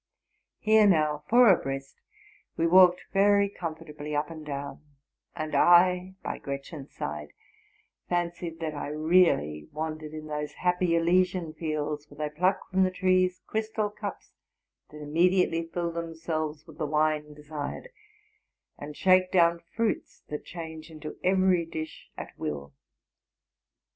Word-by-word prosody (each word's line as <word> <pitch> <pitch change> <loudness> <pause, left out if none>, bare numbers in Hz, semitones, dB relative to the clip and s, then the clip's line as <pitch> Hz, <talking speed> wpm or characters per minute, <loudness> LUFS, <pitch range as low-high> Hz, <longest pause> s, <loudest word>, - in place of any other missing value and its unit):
Here 215 -1 +5
now, 155 -5 +2
four 245 +1 +7
abreast, 135 -3 -4 0.6
we 165 - +1
walked 180 +1 +6
very 200 +1 +4
comfortably 155 -5 -6
up 150 +2 -1
and 160 -1 -8
down; 140 -1 -6 0.5
and 155 -2 -4
I, 180 +1 +5
by - - -4
Gretchen's 140 +1 -7
side, 75 -1 -6 0.8
fancied 170 -1 -2
that 155 -1 -2
I 145 - -5
really 150 - +2
wandered 155 0 -5
in 155 0 -7
those 150 -1 -4
happy 180 -1 +1
Elysian 175 0 +2
fields 150 -2 -3
where 145 - -15
they - - -23
pluei 180 +5 +2
from 190 0 +2
the 185 - +3
trees 185 0 +1
crystal 220 -1 -2
cups - - -7 0.6
that 150 0 -10
immediately 165 +2 +2
fill 170 -1 -2
themselves 160 -2 -4
with 160 0 -15
the 155 - -1
wine 150 0 0
desired, 150 0 -6 0.9
and 145 0 -8
shake 185 -1 +4
down 170 -2 +4
fruits 220 +7 -3
that 150 - -5
change 160 -2 -8
into 155 -1 -8
every 185 -2 +3
dish 160 -1 -7
at - - -8
will. 70 -1 -5
165 Hz, 135 wpm, -28 LUFS, 150-180 Hz, 0.9 s, four